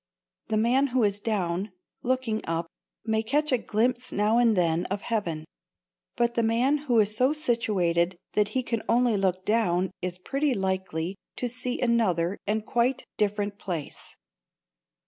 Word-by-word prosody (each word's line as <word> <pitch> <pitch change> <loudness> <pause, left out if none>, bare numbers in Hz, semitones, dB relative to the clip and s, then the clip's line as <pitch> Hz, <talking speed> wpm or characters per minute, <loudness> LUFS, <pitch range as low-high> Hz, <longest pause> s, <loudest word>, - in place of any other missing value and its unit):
The 215 - 0
man 250 +5 +3
who 255 -2 +1
is 205 -1 +1
down, 195 -2 -1 0.3
looking 255 -3 0
up, 165 +1 -1 0.4
may 220 -1 +1
catch 290 +7 0
a 255 - +4
glimpse 245 +4 0
now 210 +3 +2
and 230 -4 +4
then 170 -1 +2
of 200 +1 -3
heaven, 170 -9 -2 0.7
but 235 0 +1
the 235 - +1
man 235 +6 +2
who 235 -2 +5
is 210 0 +2
so 255 +5 +3
situated 190 - +1 0.2
that 210 -1 +2
he 255 - +1
can 230 -2 -2
only 240 -1 +3
look 185 -2 0
down 185 -5 +1
is 180 0 -3
pretty 275 +8 0
likely 190 -2 -2 0.2
to 250 - -2
see 250 +1 -3
another 200 -7 +1
and 215 +1 0
quite 240 +3 +1 0.2
different 205 -1 0
place. 170 -7 -6
215 Hz, 155 wpm, -27 LUFS, 185-240 Hz, 0.7 s, who